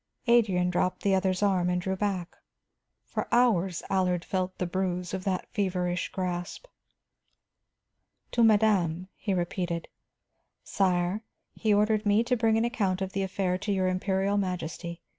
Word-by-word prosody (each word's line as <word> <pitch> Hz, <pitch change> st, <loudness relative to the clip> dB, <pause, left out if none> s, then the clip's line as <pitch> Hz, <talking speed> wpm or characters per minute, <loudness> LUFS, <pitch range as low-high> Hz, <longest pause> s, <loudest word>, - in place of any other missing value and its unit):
Adrian 200 Hz, -7 st, +3 dB
dropped 180 Hz, +1 st, 0 dB
the 200 Hz, -, +3 dB
other's 190 Hz, 0 st, +1 dB
arm 185 Hz, -3 st, +2 dB
and 180 Hz, 0 st, +1 dB
drew 190 Hz, +2 st, -2 dB
back; 190 Hz, -3 st, -2 dB, 0.7 s
for -, -, -3 dB
hours 195 Hz, -8 st, +2 dB
Allard 180 Hz, -2 st, 0 dB
felt 185 Hz, -1 st, -2 dB
the 180 Hz, -, -1 dB
bruise 180 Hz, 0 st, -2 dB
of 190 Hz, -1 st, -4 dB
that 190 Hz, -2 st, -1 dB
feverish 180 Hz, -3 st, -1 dB
grasp. 180 Hz, -, -4 dB, 1.7 s
"To 235 Hz, -, +3 dB
madame," 195 Hz, -5 st, +3 dB
he 205 Hz, -, -4 dB
repeated. 175 Hz, -1 st, -2 dB, 0.7 s
"Sire, 185 Hz, +1 st, 0 dB, 0.3 s
he 220 Hz, -, 0 dB
ordered 210 Hz, +1 st, +3 dB
me 205 Hz, +3 st, +4 dB
to 250 Hz, +1 st, +1 dB
bring 225 Hz, -1 st, +2 dB
an 225 Hz, -, +2 dB
account 200 Hz, -7 st, 0 dB
of 190 Hz, -, -5 dB
the 195 Hz, -, -1 dB
affair 190 Hz, -1 st, -1 dB
to 205 Hz, -, -2 dB
your 190 Hz, -2 st, +1 dB
Imperial 190 Hz, +2 st, 0 dB
Majesty. 175 Hz, -2 st, -4 dB
190 Hz, 145 wpm, -28 LUFS, 180-205 Hz, 1.7 s, me